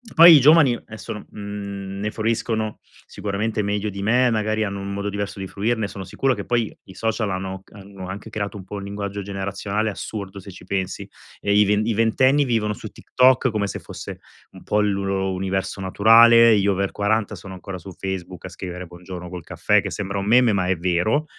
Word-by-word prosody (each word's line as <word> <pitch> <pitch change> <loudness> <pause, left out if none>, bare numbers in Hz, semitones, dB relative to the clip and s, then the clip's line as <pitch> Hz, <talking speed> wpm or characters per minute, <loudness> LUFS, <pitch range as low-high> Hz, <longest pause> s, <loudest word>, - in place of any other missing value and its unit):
Poi 170 +1 +10
i 145 - +8
giovani 145 -2 +6
adesso, 110 -4 -8
n 105 - -9
mhmm, 100 -1 -6
ne 105 +1 -2
fruiscono 110 -1 -2 0.3
sicuramente 105 +2 -2
meglio 105 +1 -1
di 100 0 -6
me, 125 +4 +3
magari 110 -1 0
hanno 100 -1 -3
un 100 0 -5
modo 100 +1 -3
diverso 100 0 -4
di 95 - -4
fruirne, 110 +2 -1
sono 95 -1 -7
sicuro 135 +7 0
che 100 -4 -6
poi 120 -3 0
i 95 - -13
social 110 +1 -1
hanno 95 0 -4
hanno 100 -2 -10
anche 100 +4 -7
creato 105 -1 -4
un 100 - -8
po' 95 +3 -8
un 100 - -5
linguaggio 100 0 -5
generazionale 100 +2 -3
assurdo, 100 -1 -6
se 100 - -11
ci 90 - -13
pensi. 95 0 -3 0.3
E 100 - +1
i 105 0 +5
ve 105 - +2
i 115 +1 0
ventenni 130 +6 +3
vivono 110 -4 0
su - - -8
TikTok 130 0 +3
come 105 -2 -1
se - - -5
fosse - - -9 0.3
un - - -14
po' 105 - +1
il 105 -1 +2
loro 95 -1 -1
universo 95 +1 -2
naturale, 115 +3 +6
gli 100 0 +1
over 100 0 +1
40 105 +1 0
sono 95 - -10
ancora 95 +1 -7
su 90 +2 -10
Facebook 95 -1 -6
a - - -6
scrivere 90 -1 -7
buongiorno 90 +1 -9
col 90 -2 -7
caffè - - +2
che - - -5
sembra 100 -1 -3
un 100 - -3
meme, 120 +1 +5
ma 95 -2 0
è 95 -1 +1
vero. 90 - +1
100 Hz, 210 wpm, -22 LUFS, 95-110 Hz, 0.3 s, Poi